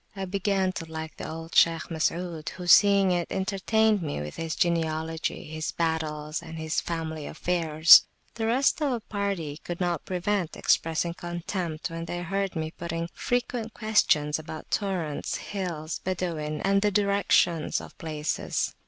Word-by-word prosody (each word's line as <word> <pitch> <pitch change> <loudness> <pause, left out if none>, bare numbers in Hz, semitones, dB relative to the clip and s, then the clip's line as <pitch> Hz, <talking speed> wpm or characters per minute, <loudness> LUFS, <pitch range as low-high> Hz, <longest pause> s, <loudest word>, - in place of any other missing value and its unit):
I 195 -1 -3
began 195 0 0
to 165 -3 -7
like 160 0 -6
the - - -6
old 165 +1 -7
Shaykh 165 -1 +4
Masud, 165 0 -1
who, 180 - -7
seeing 195 +1 +6
it, 175 -1 0
entertained 200 +2 +1
me 150 - -3
with 75 0 -6
his 165 -2 -3
genealogy, 160 -1 -1
his 155 0 -4
battles, 155 -2 -2
and 165 -1 -9
his 160 0 -1
family 160 -2 -4
affairs. 165 -2 +6 0.3
The 225 -1 -2
rest 265 +6 +2
of 295 - +2
the 240 -2 -2
party 200 -9 -3
could 175 +2 -6
not 175 -4 -1
prevent 185 -1 -1
expressing 165 +1 +1
contempt 175 -1 -4
when 165 0 -5
they 175 +1 -4
heard 195 +1 -2
me 160 -1 -2
putting 170 0 -4
frequent 245 -2 -2
questions 155 -9 +2
about 155 0 -9
torrents, 180 -8 -1
hills, 175 -6 -4
Badawin, 165 -5 -2
and 195 0 +3
the 210 - +3
directions 200 -5 +2
of - - -11
places. 155 -3 -2
170 Hz, 155 wpm, -27 LUFS, 160-195 Hz, 0.3 s, seeing